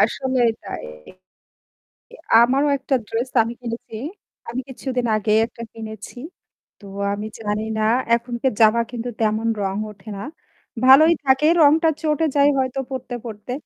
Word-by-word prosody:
আসলেই 260 -3 +2
তাই। - - -6 1.6
আমারও 270 +4 +2
একটা 270 - -2
ড্রেস 235 +3 -2
আমি 230 +2 -5
কিনেছি। 230 -2 -6 0.5
আমি 240 +2 -3
কিছুদিন 255 -1 -3
আগেই 215 0 +2
একটা 230 0 -12
কিনেছি। 220 +1 -9 0.6
তো 200 - -13 0.3
আমি 210 +1 -5
জানি 210 0 -2
না - - 0 0.3
এখনকার 240 +1 -2
জামা 220 +1 +5
কিন্তু 240 0 -4
তেমন 220 +1 +1
রং 195 0 -2
ওঠে 205 +1 -15
না। 195 - -6 0.6
ভালই 295 +6 +8
থাকে 265 +3 +3 0.2
রংটা 315 +3 +5
চটে 310 +1 +1
যায় 280 0 +5
হয়তো 260 +1 -1
পড়তে, 260 -1 -5
পড়তে। 220 +2 -7
240 Hz, 135 wpm, -21 LUFS, 220-265 Hz, 1.6 s, ভালই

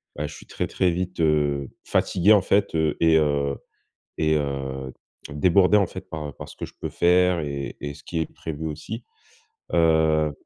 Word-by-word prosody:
bah, 75 +1 -3
je 75 - -10
suis - - -13
très, - - -3
très 90 -2 +1
vite, 90 +1 -4
heu, 75 -3 +1 0.2
fatigué 95 +3 +2
en 105 -3 +7
fait. 100 -3 +1
Heu, 80 -2 +1
et 80 -1 +4
heu 70 -2 +1 0.6
et 80 0 +2
heu, 65 -2 -4 0.4
débordé 90 +6 +4
en 100 - +4
fait, 95 +1 -9
par 75 -3 -5
par - - -8
ce - - -12
que - - -5
je - - -14
peux - - -3
faire 90 0 +3
et 70 -2 -4
et 70 0 -4
ce 70 - -15
qui 85 - -3
est 80 - -5
prévu 80 0 -5
aussi. 105 +10 -6 0.7
Heu, 80 -2 +3
80 Hz, 190 wpm, -24 LUFS, 75-90 Hz, 0.7 s, en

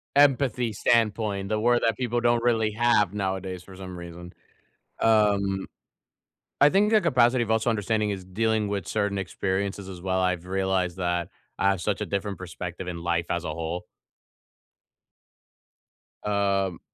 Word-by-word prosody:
Empathy 135 -4 +3
standpoint, 105 -2 +1
the 110 0 0
word 120 +2 +3
that 115 -3 +2
people 120 -1 -1
don't 120 0 +2
really 110 -3 +2
have 105 -4 +2
nowadays 95 -2 -3
for 95 - -13
some 95 -1 -8
reason. 85 0 -9 0.7
Um, 100 -3 +2 0.9
I 145 - +7
think 205 +5 +3
the 215 - +6
capacity 125 -7 +3
of 110 - -7
also 110 +2 +2
understanding 110 -1 0
is 95 -2 -4
dealing 110 +2 0
with 100 -5 -3
certain 100 0 0
experiences 95 +1 -2
as 90 -2 -8
well, 95 0 0
I've 90 -1 0
realized 95 -1 -1
that 90 -1 -1 0.3
I 95 - +3
have 100 -1 +1
such 105 +1 -1
a - - 0
different 100 0 -3
perspective 90 0 -7
in 85 - -5
life 85 -1 0
as 85 0 -2
a 75 - -3
whole. 85 +2 -4 2.4
Um 100 -3 0
100 Hz, 150 wpm, -26 LUFS, 95-110 Hz, 2.4 s, I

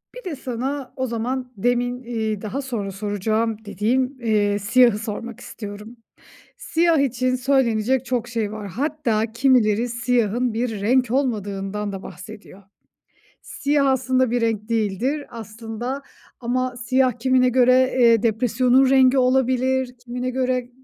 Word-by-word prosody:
Bir - - -9
de - - -4
sana 260 +2 -4
o 260 0 -2
zaman 250 +2 -3
demin, 245 +3 0
iii, 220 -3 -3
daha 230 +6 -4
sonra 230 -7 -4
soracağım 210 +3 -1
dediğim, 235 +7 0
eee, 205 -2 +1
siyahı 235 +1 +4
sormak 230 +1 -6
istiyorum. 210 +1 -9 0.6
Siyah 330 -2 +2
için 255 -1 +1
söylenecek 255 -1 +1
çok 240 -1 -2
şey 225 -4 -2
var, 215 -2 -6
hatta 230 - -1
kimileri 235 -2 +2
siyahın 240 0 0
bir 225 -3 -2
renk 250 +2 +2
olmadığından 210 -5 -2
da 195 -1 -7
bahsediyor. 200 +2 -11 0.8
Siyah 285 0 0
aslında 260 -2 +1
bir 245 - 0
renk 225 -1 -1
değildir. 230 +7 -1
Aslında 230 +4 -6 0.4
ama 255 +1 -1
siyah 255 +1 +2
kimine 255 0 +3
göre, 255 +1 +4
eee, 230 -2 +5
depresyonun 245 +3 +3
rengi 265 0 +5
olabilir, 255 0 +1
kimine 250 +1 -4
göre 255 -1 -1
245 Hz, 130 wpm, -22 LUFS, 220-255 Hz, 0.8 s, eee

